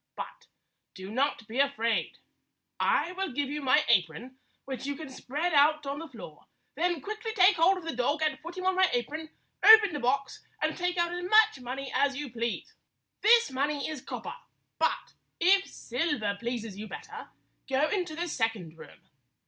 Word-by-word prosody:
But - - -8 0.5
do 190 +2 -8
not 255 -2 -1
be 235 +4 -4
afraid. 275 -5 0 0.6
I 350 - +2
will 380 -2 -3
give 280 0 -1
you 300 0 -3
my 275 +3 +4
apron, 230 +6 0 0.3
which 265 0 -5
you 285 - -2
can 310 -1 -8
spread 300 +7 -3
out 300 +1 +4
on 280 +1 -4
the 330 - -7
floor; 225 - -12 0.3
then 340 +1 -1
quickly 430 - -5
take 370 -1 +5
hold 360 +4 +4
of 365 - -8
the 330 -5 -4
dog 285 +6 0
and 305 0 -1
put 340 +3 -9
him 370 - -4
on 375 - +3
my 375 0 +4
apron, 305 +6 -3 0.3
open 435 -4 +8
the 295 - -3
box, 270 +2 -1 0.2
and - - 0
take 360 0 -2
out 345 0 +1
as 355 0 -4
much 430 -4 +5
money 260 +2 -6
as 280 -1 +2
you 290 -3 -5
please. 235 0 -4 0.5
This 465 - +5
money 285 +2 -1
is 310 -4 -6
copper, - - -6 0.5
but - - -1 0.3
if 385 +3 +4
silver 245 -6 -2
pleases 230 -4 -4
you 215 - -6
better, - - -9 0.4
go 270 +3 +2
into 355 -6 -2
the 345 +2 -3
second 215 - -3
room. 80 -2 -14
290 Hz, 180 wpm, -29 LUFS, 245-350 Hz, 0.6 s, open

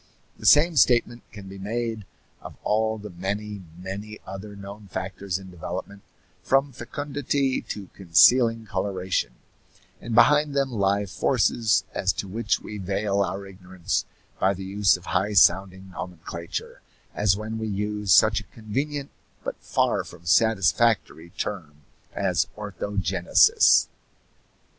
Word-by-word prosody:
The - - -2
same 155 +2 +6
statement 120 -1 +3
can 100 -3 -10
be 95 0 -10
made 110 +1 -3 0.4
of - - -10
all 110 +1 +1
the 105 -1 -9
many, 100 +3 -4 0.2
many 100 +4 -7
other 95 +2 -8
known 100 +1 -10
factors 95 0 -4
in 95 -1 -11
development, 90 +3 -7 0.4
from 135 +1 +2
fecundity 140 +1 -2
to 100 -3 -5
concealing 115 +6 +4
coloration; 95 - -2 0.7
and 115 -1 -4
behind 150 +2 +5
them 135 -1 +1
lie 100 -2 +1
forces 110 +3 +1
as - - 0
to - - -5
which 105 +3 -1
we 105 - -7
veil 100 +1 -1
our 100 0 -2
ignorance 95 -2 -4 0.3
by 95 +1 +2
the 95 - -7
use 100 0 +2
of 90 - -16
high 95 +5 0
sounding 95 0 +3
nomenclature 85 -2 -7 0.3
as 100 -2 +2
when 110 +1 -5
we 110 - -3
use 105 0 -2
such 105 +3 +6
a - - -10
convenient 135 +6 -4 0.3
but - - -4
far - - 0
from 85 -1 -14
satisfactory 105 -2 +2
term 75 -8 -5 0.3
as - - 0
orthogenesis. 100 - +3
100 Hz, 130 wpm, -25 LUFS, 95-110 Hz, 0.7 s, same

